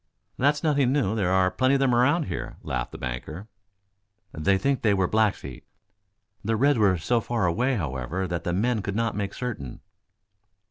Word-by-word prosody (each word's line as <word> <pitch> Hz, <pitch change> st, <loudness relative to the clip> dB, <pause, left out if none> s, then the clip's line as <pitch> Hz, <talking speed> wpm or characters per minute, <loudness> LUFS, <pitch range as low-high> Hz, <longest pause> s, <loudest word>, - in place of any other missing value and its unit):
"That's 145 Hz, +2 st, +1 dB
nothing 145 Hz, -5 st, +2 dB
new. 125 Hz, -7 st, +1 dB
There 100 Hz, -5 st, 0 dB
are 95 Hz, 0 st, +3 dB
plenty 130 Hz, +8 st, +2 dB
of -, -, +1 dB
them 135 Hz, -2 st, +2 dB
around 145 Hz, +8 st, +3 dB
here," -, -, -5 dB
laughed -, -, -3 dB
the -, -, -8 dB
banker. 75 Hz, -, -6 dB, 0.9 s
"They 95 Hz, +6 st, +2 dB
think 135 Hz, +6 st, 0 dB
they 105 Hz, -3 st, +3 dB
were 95 Hz, -1 st, +2 dB
Blackfeet. 110 Hz, 0 st, -1 dB, 0.8 s
The 110 Hz, +2 st, 0 dB
reds 140 Hz, +2 st, +3 dB
were 100 Hz, -4 st, +4 dB
so 115 Hz, +8 st, 0 dB
far 115 Hz, -3 st, -1 dB
away, 125 Hz, +10 st, +1 dB
however, 75 Hz, -, -3 dB
that 85 Hz, -2 st, -3 dB
the 85 Hz, -, -2 dB
men 110 Hz, +5 st, 0 dB
could 100 Hz, 0 st, -4 dB
not 115 Hz, -1 st, 0 dB
make 100 Hz, -1 st, -3 dB
certain." 100 Hz, -, -5 dB
110 Hz, 180 wpm, -25 LUFS, 95-125 Hz, 0.9 s, were